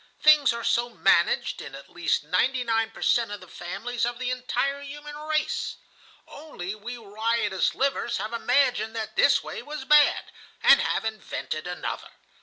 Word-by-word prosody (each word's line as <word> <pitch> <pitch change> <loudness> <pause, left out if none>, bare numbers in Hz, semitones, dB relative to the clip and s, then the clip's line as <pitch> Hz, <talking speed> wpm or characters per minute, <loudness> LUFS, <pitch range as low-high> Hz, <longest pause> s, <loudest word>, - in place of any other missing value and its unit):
Things 305 -3 +6
are 235 0 -5
so 240 0 +1
managed 235 - +2
in - - -9
at - - -11
least - - 0
ninety 255 -1 +1
nine 225 -1 0
per - - -9
cent. 230 -3 +2
of 205 - -5
the 185 - -14
families 200 +9 -5
of 240 0 0
the 255 0 -2
entire 275 +2 -1
human 295 +1 -9
race. 305 +1 -2 0.5
"Only 285 - -7
we 230 +4 -7
riotous 220 -2 -1
livers 270 -3 0
have 215 +2 -4
imagined 245 -2 +1
that 220 -1 -5
this - - +4
way - - -6
was 295 -2 -7
bad, 300 0 +4 0.3
and - - +7
have - - -1
invented 205 -7 -4
another. 180 0 -5
240 Hz, 165 wpm, -26 LUFS, 220-280 Hz, 0.5 s, and